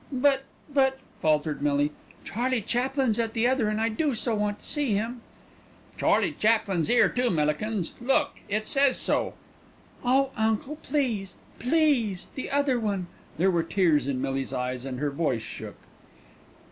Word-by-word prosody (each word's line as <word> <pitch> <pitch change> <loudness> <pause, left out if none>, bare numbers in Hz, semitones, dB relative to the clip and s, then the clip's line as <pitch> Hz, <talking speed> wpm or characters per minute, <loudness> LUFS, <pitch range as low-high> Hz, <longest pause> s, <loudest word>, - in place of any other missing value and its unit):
"But 270 0 +2 0.3
but 265 -1 +3
" - - -29
faltered 155 -1 +1
Millie, 145 0 +2 0.3
"Charlie 245 +1 -1
Chaplin's 250 0 0
at 225 -1 -1
the 225 +1 +1
other 255 -4 +2
and 215 0 -1
I 225 - +2
do 270 +4 0
so 230 +1 -1
want 210 -1 -1
to - - -18
see 290 -7 0
him." 230 +4 -2 0.7
"Charlie - - +2
Chaplin's 210 -7 +1
'ere 240 - +5
too, 250 0 0
Millikins. 165 +5 0
Look, 285 +3 +1
it 215 +1 -1
says 275 +1 +3
so." - - +1 0.7
"Oh, 265 +2 +3
uncle, 220 +6 0
please, 235 - -2 0.2
please, 250 - +1
the 260 - -5
other 280 -3 +2
one." 200 -5 -2 0.3
There 190 +4 +3
were 170 -2 +2
tears 165 -5 +2
in 135 -2 -1
Millie's 135 0 -2
eyes 125 0 -3
and 130 -2 -4
her 145 0 -1
voice 140 -6 -1
shook. - - -8
220 Hz, 160 wpm, -27 LUFS, 170-260 Hz, 0.7 s, ere